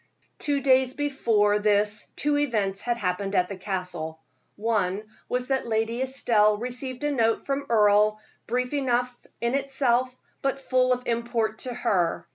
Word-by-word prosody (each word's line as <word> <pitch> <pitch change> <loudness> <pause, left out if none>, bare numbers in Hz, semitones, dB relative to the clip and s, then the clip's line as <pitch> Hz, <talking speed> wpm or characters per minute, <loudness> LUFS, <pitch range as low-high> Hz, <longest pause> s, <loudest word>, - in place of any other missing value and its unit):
Two 285 -2 0
days 260 -1 +3
before 225 -8 +2
this 210 0 +1
two 295 0 0
events 205 -8 0
had 240 -1 -1
happened 195 -1 -2
at 180 -1 +2
the 200 - -5
Castle. 180 -4 -4 0.4
One 205 -2 0 0.3
was 250 +1 -1
that 265 -3 0
Lady 225 +2 -1
Estelle 230 -5 +3
received 250 +3 -5
a 295 - +1
note 230 -4 +1
from 275 0 -2
Earle, 210 -1 +4 0.3
brief 250 +3 -1
enough 250 -3 0 0.3
in 235 +1 0
itself, 260 -2 0 0.2
but 275 0 0
full 255 -1 +2
of 250 0 0
import 230 -2 -1
to 250 - -3
her. 185 -9 0
235 Hz, 150 wpm, -26 LUFS, 210-260 Hz, 0.4 s, Earle